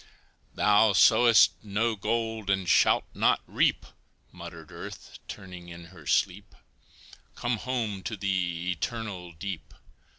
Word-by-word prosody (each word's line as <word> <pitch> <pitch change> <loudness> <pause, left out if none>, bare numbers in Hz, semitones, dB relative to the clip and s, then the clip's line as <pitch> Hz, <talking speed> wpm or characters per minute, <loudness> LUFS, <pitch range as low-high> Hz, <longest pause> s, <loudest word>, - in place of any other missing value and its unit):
"Thou 105 0 +4
sow'st 115 +3 +6
no 110 +2 0
gold, 110 0 -2
and 95 -2 0
shalt - - +4
not - - +2
reap!" - - +1 0.5
Muttered 85 -2 -11
earth, - - -10
turning 90 -3 -9
in 85 0 -10
her 80 -6 -14
sleep; - - 0 0.8
"Come 120 -1 -1
home 115 -5 -3
to 110 - -4
the 90 -3 -1
Eternal 90 -1 -5
Deep!" 95 +1 -7
100 Hz, 120 wpm, -27 LUFS, 90-110 Hz, 0.8 s, sow'st